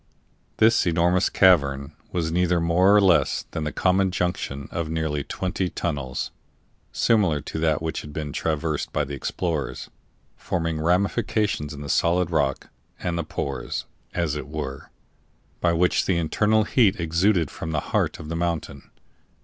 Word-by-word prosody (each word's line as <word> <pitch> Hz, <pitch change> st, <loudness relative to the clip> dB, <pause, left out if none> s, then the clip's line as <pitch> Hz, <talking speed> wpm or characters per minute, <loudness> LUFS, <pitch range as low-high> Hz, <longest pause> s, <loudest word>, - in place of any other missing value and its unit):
This 110 Hz, -3 st, +4 dB
enormous 85 Hz, +2 st, +2 dB
cavern 70 Hz, -7 st, +3 dB, 0.2 s
was 80 Hz, -2 st, -1 dB
neither 90 Hz, 0 st, +2 dB
more 90 Hz, +4 st, +4 dB
or -, -, +7 dB
less 95 Hz, -4 st, +3 dB
than 80 Hz, -, -3 dB
the 75 Hz, -, -2 dB
common 95 Hz, +1 st, +2 dB
junction 90 Hz, -6 st, -2 dB
of 85 Hz, -3 st, -3 dB
nearly 80 Hz, -3 st, -1 dB
twenty 90 Hz, +2 st, -2 dB
tunnels 65 Hz, -6 st, -3 dB, 0.6 s
(similar 100 Hz, -10 st, +2 dB
to 80 Hz, -, -5 dB
that 80 Hz, -1 st, +1 dB
which 80 Hz, -, -2 dB
had 75 Hz, -, -10 dB
been 75 Hz, -1 st, -5 dB
traversed 80 Hz, -1 st, -2 dB
by 75 Hz, -, 0 dB
the 70 Hz, 0 st, -6 dB
explorers), 70 Hz, -2 st, -3 dB, 0.4 s
forming 80 Hz, -3 st, -2 dB
ramifications 100 Hz, -1 st, 0 dB
in 70 Hz, -, -8 dB
the 70 Hz, -, -6 dB
solid 85 Hz, +3 st, +2 dB
rock, 70 Hz, -4 st, 0 dB, 0.3 s
and 90 Hz, -1 st, -2 dB
the 85 Hz, -, -1 dB
pores, 70 Hz, -3 st, -4 dB, 0.3 s
as 85 Hz, -4 st, 0 dB
it 75 Hz, -2 st, -5 dB
were, 70 Hz, -3 st, -6 dB, 0.7 s
by 85 Hz, -, +2 dB
which 85 Hz, +2 st, +2 dB
the 95 Hz, -, +2 dB
internal 105 Hz, +6 st, +2 dB
heat 110 Hz, -4 st, +3 dB
exuded 85 Hz, 0 st, +2 dB
from 80 Hz, -, -6 dB
the 80 Hz, -1 st, 0 dB
heart -, -, +1 dB
of 75 Hz, -, -9 dB
the 85 Hz, -, -4 dB
mountain. 85 Hz, -5 st, -3 dB
85 Hz, 155 wpm, -24 LUFS, 75-90 Hz, 0.7 s, or